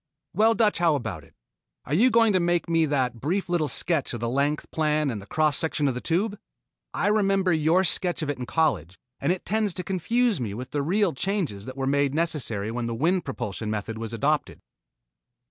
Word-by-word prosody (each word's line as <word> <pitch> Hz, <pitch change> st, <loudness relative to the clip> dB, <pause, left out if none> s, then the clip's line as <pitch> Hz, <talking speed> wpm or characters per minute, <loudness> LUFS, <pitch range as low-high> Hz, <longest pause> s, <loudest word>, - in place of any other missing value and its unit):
"Well, 220 Hz, +4 st, +4 dB
Dutch, 215 Hz, -5 st, +2 dB
how 170 Hz, -3 st, +3 dB
about 135 Hz, -, -4 dB
it? -, -, -22 dB, 0.5 s
Aren't 150 Hz, +7 st, 0 dB
you 250 Hz, +3 st, +6 dB
going 225 Hz, -2 st, +4 dB
to 185 Hz, -, +3 dB
make 175 Hz, 0 st, +1 dB
me 165 Hz, -1 st, +2 dB
that 125 Hz, -5 st, -1 dB
brief 185 Hz, +8 st, -1 dB
little 175 Hz, -4 st, 0 dB
sketch 145 Hz, -1 st, 0 dB
of -, -, -5 dB
the 115 Hz, -, -2 dB
length 140 Hz, +4 st, -1 dB
plan 150 Hz, -2 st, +1 dB
and 100 Hz, -3 st, -7 dB
cross 155 Hz, -3 st, +2 dB
section 155 Hz, -3 st, 0 dB
of 135 Hz, -, +1 dB
the 125 Hz, -, -5 dB
Tube? 200 Hz, +5 st, -1 dB, 0.5 s
I -, -, -2 dB
remember 195 Hz, -3 st, +2 dB
your 160 Hz, +4 st, +3 dB
sketch 175 Hz, -1 st, +2 dB
of 150 Hz, -, -3 dB
it 140 Hz, -, -7 dB
in 125 Hz, -, -5 dB
college, 95 Hz, -, 0 dB, 0.2 s
and 140 Hz, +5 st, +1 dB
it 185 Hz, -, -3 dB
tends 215 Hz, -3 st, 0 dB
to 180 Hz, -, -1 dB
confuse 210 Hz, -, 0 dB
me 105 Hz, -4 st, -3 dB
with 125 Hz, +3 st, -7 dB
the 145 Hz, -, -1 dB
real 185 Hz, +5 st, +1 dB
changes 150 Hz, -, -2 dB
that 130 Hz, +1 st, -8 dB
were 135 Hz, -, -2 dB
made 140 Hz, +1 st, +1 dB
necessary 125 Hz, -11 st, -1 dB
when 120 Hz, 0 st, -3 dB
the 115 Hz, -, -3 dB
wind 175 Hz, +7 st, +1 dB
propulsion 110 Hz, -5 st, -4 dB
method 110 Hz, +1 st, -4 dB
was 115 Hz, -1 st, -5 dB
adopted." 145 Hz, +6 st, -1 dB
155 Hz, 210 wpm, -25 LUFS, 130-185 Hz, 0.5 s, you